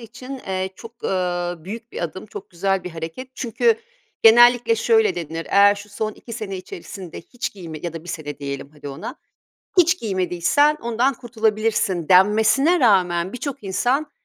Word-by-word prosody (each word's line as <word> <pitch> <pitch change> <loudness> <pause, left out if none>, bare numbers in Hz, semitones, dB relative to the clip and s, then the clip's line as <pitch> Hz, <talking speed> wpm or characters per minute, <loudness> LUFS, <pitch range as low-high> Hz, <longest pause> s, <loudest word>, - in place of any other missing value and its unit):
için, 250 +3 -9
eee, 190 0 -2
çok, 230 +1 -13
ııı, 175 -2 -2
büyük 225 +5 -8
bir - - -4
adım, 175 +4 -5
çok 200 - -10
güzel 190 +1 -1
bir 180 - -5
hareket 165 +11 -7
çünkü 360 - +2 0.5
genellikle 240 - +7
şöyle 445 -1 +3
denir, 165 -1 -5
"Eğer 200 +1 +6
şu 205 +1 -11
son 215 +1 -3
2 230 - -12
sene 215 -4 -5
içerisinde 185 -1 -9
hiç 245 +8 -6
giyme 165 -6 -8
ya 170 - -3
da 165 0 -8
1 - - -12
sene 145 -3 -6
diyelim 140 -1 -6
hadi 150 -1 -9
ona, 140 - -7 0.6
hiç 360 +1 +5
giymediysen 190 - +2
ondan 235 +4 +1
kurtulabilirsin." 220 -7 0
denmesine 220 - +5
rağmen 185 -6 +3
birçok 275 +1 -5
insan, 255 +10 0
205 Hz, 160 wpm, -22 LUFS, 175-240 Hz, 0.6 s, genellikle